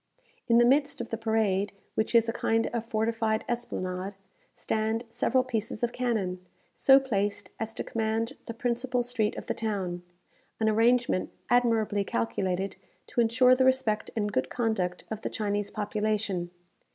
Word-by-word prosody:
In 235 Hz, -, +5 dB
the 240 Hz, -, +6 dB
midst 280 Hz, +3 st, +3 dB
of 235 Hz, -, -5 dB
the -, -, -1 dB
parade, 215 Hz, -3 st, +1 dB, 0.2 s
which 220 Hz, +2 st, -1 dB
is 230 Hz, 0 st, +6 dB
a 230 Hz, -, -1 dB
kind 225 Hz, -1 st, +1 dB
of 230 Hz, -1 st, -2 dB
fortified 220 Hz, 0 st, 0 dB
esplanade, 195 Hz, -5 st, -3 dB, 0.4 s
stand 220 Hz, +1 st, -1 dB
several 255 Hz, +2 st, +2 dB
pieces 225 Hz, -2 st, -3 dB
of 240 Hz, -, +1 dB
cannon, 205 Hz, -8 st, -1 dB, 0.3 s
so 270 Hz, 0 st, +6 dB
placed 205 Hz, -6 st, -2 dB
as 225 Hz, 0 st, -2 dB
to -, -, -2 dB
command 225 Hz, 0 st, -1 dB
the 230 Hz, -, -4 dB
principal 245 Hz, +1 st, 0 dB
street 235 Hz, -3 st, 0 dB
of -, -, -6 dB
the -, -, -1 dB
town 190 Hz, -5 st, -3 dB, 0.6 s
an 220 Hz, -, +2 dB
arrangement 230 Hz, -2 st, +3 dB, 0.2 s
admirably 225 Hz, -4 st, +3 dB
calculated 185 Hz, +10 st, -1 dB, 0.3 s
to 240 Hz, -, 0 dB
ensure 250 Hz, +2 st, +5 dB
the 255 Hz, +1 st, +3 dB
respect 260 Hz, -5 st, +2 dB
and 210 Hz, -2 st, 0 dB
good -, -, 0 dB
conduct 220 Hz, -7 st, -1 dB
of 220 Hz, -1 st, -4 dB
the -, -, -3 dB
Chinese 205 Hz, -1 st, -2 dB
population. 210 Hz, -4 st, -1 dB
220 Hz, 155 wpm, -28 LUFS, 205-240 Hz, 0.6 s, the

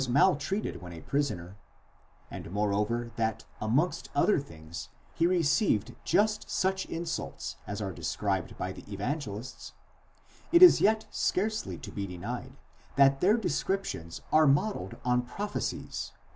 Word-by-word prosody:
maltreated 150 Hz, -, +2 dB
when 90 Hz, -1 st, -8 dB
a 80 Hz, -, -9 dB
prisoner, 95 Hz, -, -2 dB, 0.8 s
and -, -, -7 dB
moreover 105 Hz, +4 st, 0 dB
that 110 Hz, -1 st, -1 dB, 0.2 s
amongst 130 Hz, +11 st, +1 dB
other 175 Hz, +7 st, +4 dB
things 80 Hz, -, -9 dB, 0.2 s
he 170 Hz, -, +2 dB
received 165 Hz, -, +2 dB
just 215 Hz, +1 st, +2 dB
such 190 Hz, 0 st, 0 dB
insults 165 Hz, 0 st, -4 dB
as -, -, -3 dB
are -, -, -3 dB
described -, -, -2 dB
by -, -, -3 dB
the -, -, -11 dB
Evangelists: 120 Hz, +2 st, -4 dB, 0.8 s
it 345 Hz, +1 st, +8 dB
is 360 Hz, -, +10 dB
yet 220 Hz, +1 st, +3 dB
scarcely 215 Hz, +3 st, -1 dB
to -, -, -9 dB
be 100 Hz, -1 st, -4 dB
denied, 120 Hz, +9 st, -6 dB, 0.4 s
that 135 Hz, 0 st, +5 dB
their 205 Hz, +5 st, +5 dB
descriptions 185 Hz, -, -2 dB
are 155 Hz, -1 st, +6 dB
modelled 140 Hz, -, +1 dB
on 125 Hz, 0 st, +3 dB
prophecies. 200 Hz, +12 st, -4 dB
140 Hz, 130 wpm, -30 LUFS, -, 0.8 s, is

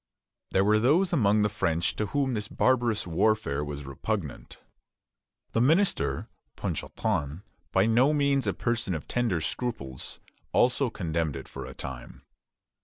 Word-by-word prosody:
There 95 Hz, +1 st, +2 dB
were 105 Hz, +1 st, +4 dB
those 165 Hz, -, +3 dB
among 105 Hz, -7 st, +4 dB
the -, -, +4 dB
French 85 Hz, -5 st, 0 dB
to 105 Hz, -, 0 dB
whom 135 Hz, 0 st, 0 dB
this 105 Hz, -2 st, -2 dB
barbarous 120 Hz, -4 st, +2 dB
warfare 85 Hz, -5 st, +1 dB
was 75 Hz, -1 st, -6 dB
repugnant. 75 Hz, -, -4 dB, 0.9 s
The 115 Hz, -, +1 dB
minister, 165 Hz, +10 st, +2 dB, 0.3 s
Ponchartrain, 90 Hz, -6 st, -2 dB, 0.3 s
by 95 Hz, -, +4 dB
no 120 Hz, +6 st, +4 dB
means 140 Hz, -4 st, +2 dB
a 100 Hz, -, +2 dB
person 115 Hz, -6 st, -1 dB
of 75 Hz, -, -6 dB
tender 115 Hz, -8 st, 0 dB
scruples, 75 Hz, -, -4 dB, 0.3 s
also 125 Hz, +1 st, +3 dB
condemned 80 Hz, -7 st, -2 dB
it -, -, -7 dB
for -, -, -7 dB
a -, -, -9 dB
time. 65 Hz, -2 st, -8 dB
105 Hz, 140 wpm, -28 LUFS, 85-125 Hz, 0.9 s, were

